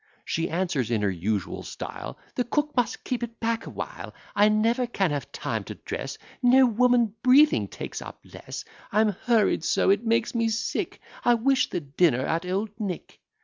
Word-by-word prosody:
She 165 +1 -1
answers, 170 - -1
in 110 -3 0
her 100 - +2
usual 95 +3 -2
style, 60 - -7 0.2
"The 250 - 0
cook 295 +5 -1
must 245 -3 0
keep 250 -1 -2
it 235 -1 -6
back 230 0 -1
a - - -5
while; - - -7 0.2
I 205 +1 +5
never 230 +4 +2
can 195 -8 0
have 145 -1 -4
time - - -3
to - - -7
dress, - - -5 0.2
No 260 +1 +6
woman 240 -2 +3
breathing 280 +4 +5
takes - - -6
up - - -9
less; - - -8 0.3
I'm 215 +1 +4
hurried 215 -2 +2
so, 190 - +3
it 200 +3 +2
makes 230 0 +1
me 230 -1 +1
sick; 225 0 -2 0.2
I 240 - +5
wish 265 +3 +2
the 175 - -2
dinner 140 -2 +2
at 165 +2 -1
Old 200 +3 -1
Nick." 195 -6 -5
220 Hz, 185 wpm, -26 LUFS, 170-240 Hz, 0.3 s, No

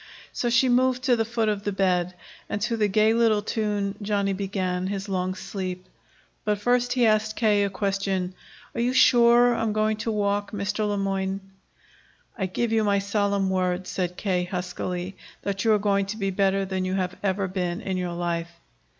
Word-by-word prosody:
So 240 - -1
she 240 +2 +4
moved 255 +1 +2
to 255 -2 +4
the 225 - +1
foot 230 0 -1
of 205 -1 -1
the 205 - -1
bed, 180 -2 +1 0.3
and 205 - -2
to 235 0 0
the 215 -2 +2
gay 215 +2 +3
little 225 -3 +3
tune 205 -2 -1
Johnny 200 -1 0
began 185 -2 -2
his 195 +1 -4
long 185 -1 -1
sleep. 185 -1 -5 0.6
But 210 -1 +1
first 245 +3 +2
he 250 -2 +3
asked 215 0 +2
K. 210 -3 +3
a - - -1
question: 195 -1 -1 0.4
"Are - - -2
you 245 +2 +1
sure 240 -1 +6
I'm 225 -2 -1
going 215 0 +1
to 225 +1 -2
walk, 205 0 -1
Mr. 210 +1 -1
Le 205 - -1
Moyne?" 195 0 -1 1.0
"I 190 -5 -2
give 225 +5 -1
you 220 -1 +3
my 200 -1 +2
solemn 200 -1 0
word," 185 0 0
said 180 -1 -3
K. 180 -3 0
huskily, 180 0 -4 0.3
"that 195 0 -2
you 225 - +5
are 215 - +5
going 200 -1 +1
to 210 +2 -4
be 195 -2 -1
better 195 0 +1
than 190 -1 -2
you 185 0 -1
have 185 -1 -2
ever 195 0 0
been 180 -1 -2
in 190 -4 -3
your 180 -1 -2
life." 170 -1 -2
200 Hz, 195 wpm, -25 LUFS, 185-215 Hz, 1.0 s, sure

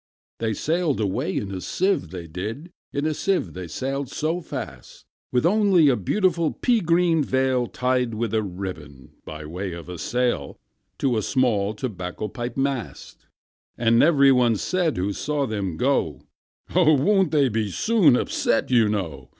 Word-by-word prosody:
II. 115 - 0
They 110 - 0
sailed 160 - 0
away 95 -2 -1
in 100 - -3
a 95 - -5
sieve, 185 - 0
they 90 -1 -7
did, 110 - -6 0.2
In 140 +1 -2
a 155 - +1
sieve 180 - -1
they 90 -1 -6
sailed 135 - -3
so 160 +5 -2
fast, 105 - -8 0.3
With 125 +4 +1
only 190 -5 +4
a 130 - +3
beautiful 170 - +1
pea 245 -2 +2
green 170 -3 +2
veil 130 -2 +1
Tied 125 -2 -1
with 115 -1 -2
a 110 - +2
ribbon, 90 -9 -7
by 75 0 -8
way 90 +4 -5
of 85 +1 -9
a 90 -2 -7
sail, 120 - -1 0.4
To 130 -4 +1
a - - +1
small 110 -5 +1
tobacco 105 -3 -5
pipe 120 +3 -6
mast. 135 -4 -4 0.5
And 115 0 +3
every 140 -3 +5
one 125 -3 +3
said 170 - -1
who 95 +3 -1
saw 145 +5 -1
them 100 -8 -3
go, 100 - 0 0.5
"Oh! 170 -4 +5
won't 190 +7 +3
they 145 -3 +3
be 110 -3 -1
soon 185 - +3
upset, 125 - 0
you 115 -4 +4
know? 80 -11 -4
125 Hz, 165 wpm, -23 LUFS, 95-150 Hz, 0.5 s, every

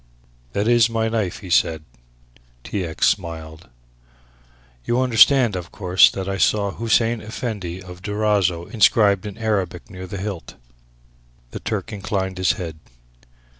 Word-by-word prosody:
"That 100 +2 0
is 120 -1 +4
my 115 -1 0
knife," 105 -2 -2
he 95 -3 -9
said. 80 -2 +2 0.8
T. 100 - -3
X. 80 -1 0
smiled. 80 -4 -3 1.1
"You 120 - 0
understand, 125 -2 +5
of 90 -2 -6
course, 95 -2 +5
that 95 -1 -5
I 95 0 -3
saw 100 0 +2
'Hussein 115 +1 +1
Effendi 105 -5 -5
of 90 0 -11
Durazzo' 105 -4 0
inscribed 105 -2 +3
in 100 0 -8
Arabic 100 -4 -2
near 95 -1 -8
the 100 - -6
hilt." 95 -3 -6 1.0
The - - -6
Turk 105 -1 -4
inclined 95 -2 -3
his 95 - +3
head. 80 -4 -7
100 Hz, 135 wpm, -21 LUFS, 90-110 Hz, 1.1 s, understand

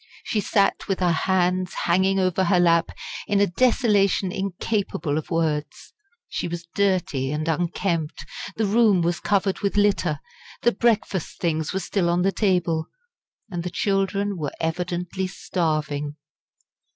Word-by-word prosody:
She 215 - -1
sat 200 0 +1
with 195 - -1
her 180 -2 +3
hands 180 +1 +1
hanging 190 +3 +3
over 185 0 +2
her 180 0 +3
lap 170 -1 +4 0.4
in 205 -1 +2
a 205 - +5
desolation 200 -3 +2
incapable 190 -4 -2
of 155 - -3
words. 155 -3 -2 0.3
She - - -3
was 170 0 -6
dirty 180 -9 +1
and 155 +1 -2
unkempt; 170 0 -1 0.3
the 220 - 0
room 205 -3 +4
was 175 +1 0
covered 195 -1 +1
with 200 0 -1
litter; 195 -7 +2 0.4
the 240 - +5
breakfast 220 -7 0
things 160 -3 0
were 190 - -1
still 190 -2 0
on 175 +1 +2
the 195 - +3
table; 180 -5 +1 0.6
and 175 -2 -3
the 180 - -3
children 195 +1 0
were 150 -3 -3
evidently 180 +3 -2
starving. 155 -6 -2
180 Hz, 140 wpm, -24 LUFS, 165-195 Hz, 0.6 s, a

